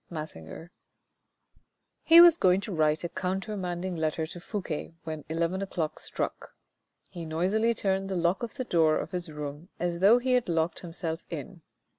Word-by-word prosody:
— - - -44
Massinger. 155 - -8 1.3
He 330 +1 +8
was 345 -2 +9
going 185 - +3
to 205 - -6
write 155 -1 +1
a 170 - -2
countermanding 185 -1 -3
letter 160 0 -1
to 175 +2 -9
Fouque 170 -4 -5
when 155 -2 -5
eleven 170 +4 -1
o'clock 170 -5 -3
struck. - - -5 0.6
He 170 - -7
noisily 190 +9 +1
turned 195 -1 -1
the 190 - -2
lock 175 +1 +1
of 235 +2 -5
the 260 - -3
door 160 -6 +3
of - - -4
his 180 -3 -4
room 150 +3 -7
as 175 -1 -1
though 205 +6 +7
he 255 +1 -1
had 250 -6 +2
locked 165 0 0
himself 165 -1 -5
in. 165 +3 -7
175 Hz, 170 wpm, -28 LUFS, 160-195 Hz, 1.3 s, was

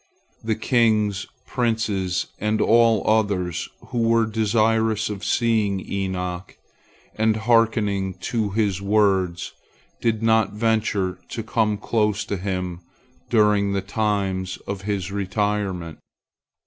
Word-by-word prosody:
The 110 -1 0
kings, 110 -4 +1 0.2
princes, 105 -7 -1
and 105 +1 0
all 115 -2 +4
others 100 -6 +1 0.2
who 120 - -2
were 115 0 +3
desirous 110 0 +1
of 100 -2 -6
seeing 110 -5 +1
Enoch 95 -2 -4 0.6
and 110 0 +2
hearkening 110 -4 +1
to 110 +1 -1
his 100 -2 0
words 100 -4 +1 0.5
did 115 -1 0
not 110 -2 +3
venture 105 -4 0
to 115 - -4
come 110 -2 0
close 105 -1 0
to 100 - -3
him 90 -2 -3 0.5
during 105 -3 +3
the 100 - 0
times 95 -3 -1
of 100 -1 -4
his 95 -2 -2
retirement. 100 -4 -2
105 Hz, 110 wpm, -23 LUFS, 95-110 Hz, 0.6 s, all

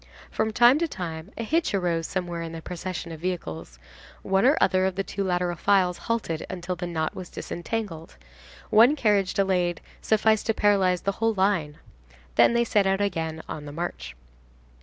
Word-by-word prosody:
From 220 - 0
time 240 +5 +5
to 335 - +1
time, 165 - -6
a 230 - -3
hitch 315 0 0
arose 170 -3 0
somewhere 175 -2 -3
in 165 0 -6
the 165 - -6
procession 180 -1 -5
of 160 - -8
vehicles; 155 - -5 0.5
one 195 +5 +3
or 285 - +4
other 185 0 +3
of 190 - -3
the 195 - -1
two 195 +2 -4
lateral 180 -1 0
files 185 -1 +2
halted 205 -9 -1
until 180 -1 -4
the 175 0 -5
knot 160 -2 -2
was 180 -2 -8
disentangled; 175 -3 -5 0.6
one 230 +7 +6
carriage 205 -8 +1
delayed 180 -3 +1 0.2
sufficed 220 0 +2
to 225 - +1
paralyze 190 -3 +3
the 200 - 0
whole 225 -1 +2
line. 185 -7 +1 0.6
Then - - +5
they 235 - +4
set 205 -4 +2
out 195 0 +1
again 165 -5 -2
on 150 -1 -6
the 145 - -7
march. 145 - -5
185 Hz, 180 wpm, -25 LUFS, 170-205 Hz, 0.6 s, one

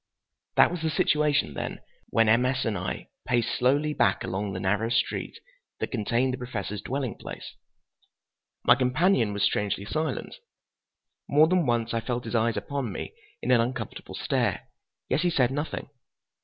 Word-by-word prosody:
That - - +6
was 175 -2 -4
the 160 - 0
situation, 150 - +2
then, - - -4 0.3
when 115 0 +3
M. 115 +3 +5
S. 130 +1 0
and 110 - 0
I - - -4 0.2
paced 120 -2 +1
slowly 145 +4 +2
back 95 -9 +2
along 100 +1 -2
the 95 - -4
narrow 105 +4 +1
street 115 0 -1 0.4
that - - -3
contained 120 +2 +1
the 130 - -4
Professor's 105 -5 -4
dwelling 130 +1 -2
place. - - -8 1.1
My - - +7
companion 130 - +2
was 100 0 -1
strangely 100 -1 0
silent. 155 +8 -3 0.9
More 150 +2 +6
than 175 -4 +2
once 120 -1 +1
I 115 - 0
felt 120 +1 -3
his - - -5
eyes 115 0 +2
upon 140 -6 -3
me 95 - -6 0.3
in - - +1
an 120 -2 +6
uncomfortable 120 -2 -4
stare, - - 0 0.4
yet 135 +4 +1
he 175 - +2
said 130 -6 +2
nothing. 145 +3 -3
125 Hz, 165 wpm, -27 LUFS, 110-140 Hz, 1.1 s, My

